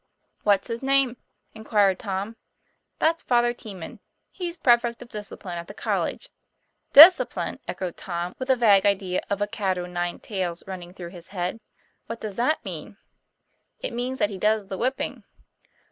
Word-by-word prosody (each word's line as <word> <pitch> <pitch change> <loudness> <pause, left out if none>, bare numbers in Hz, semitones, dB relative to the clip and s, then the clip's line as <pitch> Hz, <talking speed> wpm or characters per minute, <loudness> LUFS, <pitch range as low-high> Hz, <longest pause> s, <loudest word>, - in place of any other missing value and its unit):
'What's 200 -2 +2
his 230 -1 -4
name?" 270 -2 +2 0.4
inquired 210 -4 +2
Tom. 200 +2 -4 0.6
'That's 330 +1 +2
Father 240 -1 +2
Teeman, 195 -8 -9 0.3
he's 350 -2 -5
prefect 240 -4 +3
of 240 - -17
discipline 205 -4 -7
at 170 - -8
the - - -10
college." - - -2 0.6
'Discipline!" 330 +6 +7
echoed 180 -3 -4
Tom, 175 0 -4
with 260 +1 -5
a 260 - +6
vague 205 -5 +5
idea 190 -2 0
of 200 0 0
a - - -1
cat 195 -3 -1
o' 175 - -3
nine 175 0 -3
tails 180 -5 -4
running 180 -2 -7
through 180 -2 -8
his 175 -1 -12
head; 185 +2 -3 0.5
"what 230 0 -6
does 215 -2 -5
that 250 +9 0
mean?" - - -6 0.8
'It - - -4
means 250 +2 -3
that 205 - +1
he 190 - -6
does 210 -1 +1
the 190 - -4
whipping." 260 +3 -2
205 Hz, 160 wpm, -25 LUFS, 185-240 Hz, 0.8 s, Discipline